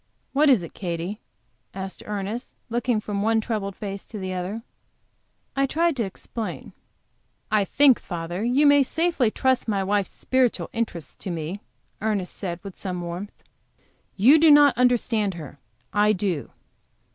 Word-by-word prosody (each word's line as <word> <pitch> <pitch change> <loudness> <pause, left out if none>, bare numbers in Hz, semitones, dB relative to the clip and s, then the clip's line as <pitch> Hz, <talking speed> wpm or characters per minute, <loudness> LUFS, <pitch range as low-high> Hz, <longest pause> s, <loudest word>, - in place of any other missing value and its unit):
What 290 +2 +4
is 240 -10 +5
it, 165 - -9
Katy?" 180 +3 -4 0.6
asked 190 0 -6
Ernest; 210 +4 -4 0.2
looking 240 -1 +1
from 205 -1 -3
one 225 +1 +3
troubled 210 -4 -3
face 200 -2 -6
to 220 - -8
the 190 -2 -4
other. 185 +5 -4 0.9
I 275 0 +2
tried 335 +3 +1
to 235 - +1
explain. 215 +3 -6 0.8
"I 210 -2 +3
think, 275 +3 +5
father, 175 +2 -4
you 255 +5 +3
may 285 0 +7
safely 310 -3 +2
trust 260 +3 +1
my 200 -3 0
wife's 200 0 0
spiritual 260 -2 0
interests 220 -9 -3
to - - -6
me," 170 +3 -4 0.4
Ernest 205 -4 -1
said, 175 -3 -4
with 195 -2 -9
warmth. 180 +1 -5 0.7
"You 260 +11 +6
do 320 +1 +6
not 290 -1 +7
understand 230 -5 +2
her. 150 -4 -9 0.3
I 210 0 +4
do. 185 -7 -2
210 Hz, 145 wpm, -24 LUFS, 190-245 Hz, 0.9 s, may